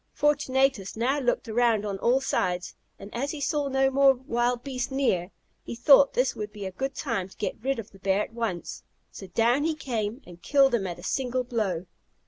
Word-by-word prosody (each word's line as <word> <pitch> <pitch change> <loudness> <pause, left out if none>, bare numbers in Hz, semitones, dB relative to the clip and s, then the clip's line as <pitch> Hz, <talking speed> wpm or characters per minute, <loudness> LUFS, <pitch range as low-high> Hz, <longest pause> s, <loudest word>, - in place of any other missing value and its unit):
Fortunatus 270 -8 +1
now 260 +5 +1
looked 245 -1 0
around 225 -2 +2
on 200 -2 -3
all 250 +5 +2
sides; 180 -8 -1 0.2
and 200 +1 -11
as 270 +4 -2
he 305 - -5
saw 290 0 0
no 270 0 +2
more 275 0 +5
wild 245 -1 -1
beasts 255 -3 -3
near, 250 -10 0 0.3
he - - -7
thought 275 +3 +6
this 255 +1 +1
would 210 -1 -5
be 205 -1 -7
a 190 - -4
good 270 +8 -4
time 225 -9 -2
to - - -18
get 215 - -4
rid 270 +2 -1
of 225 -2 -7
the 195 - -17
bear 195 +2 +1
at - - -10
once; 225 -7 -4 0.3
so 195 - -9
down 235 +9 +2
he 320 0 0
came, 235 -4 -3
and 175 -1 -13
killed 275 +4 +4
him 200 -5 +1
at 175 - -5
a 175 - -12
single 255 +4 -1
blow. 205 -8 -2
240 Hz, 210 wpm, -27 LUFS, 205-270 Hz, 0.3 s, thought